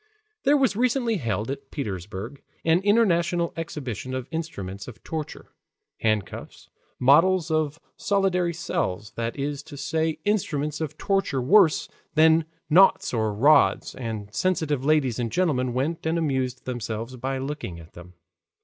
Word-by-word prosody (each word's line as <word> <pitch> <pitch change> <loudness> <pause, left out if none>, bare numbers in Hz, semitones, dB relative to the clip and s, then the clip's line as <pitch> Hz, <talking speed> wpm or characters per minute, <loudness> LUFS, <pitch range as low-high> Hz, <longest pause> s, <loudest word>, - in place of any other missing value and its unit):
There 290 +2 +5
was 265 -7 +2
recently 240 -1 +1
held 115 -4 -2
at 140 0 -7
Petersburg 105 - -5 0.2
an 165 +1 +4
international 180 -5 +2
exhibition 135 -6 -5
of 130 -1 -4
instruments 100 - -5
of 120 - -11
torture, 155 -2 -6 0.5
handcuffs, 110 -3 -3 0.3
models 165 +6 +4
of 155 0 0 0.2
solitary 190 -3 +1
cells, 105 - -3
that 115 +2 -4
is 145 +1 -3
to 145 -1 -11
say 160 +2 -1
instruments 155 -8 -1
of 155 -1 -4
torture 195 -9 0
worse 165 +5 +4 0.3
than 160 0 +5 0.2
knouts 180 +1 +5
or 110 -2 +1
rods, 140 +9 +4
and 110 -4 -6
sensitive 150 -2 0
ladies 140 -6 +2
and 115 -2 -2
gentlemen 140 -9 +1
went 150 +7 -2
and 165 +1 +1
amused 130 -5 -1
themselves 115 -1 -4
by 135 +2 -3
looking 135 - -5
at 80 0 -14
them. 90 +1 -13
145 Hz, 140 wpm, -25 LUFS, 120-170 Hz, 0.5 s, There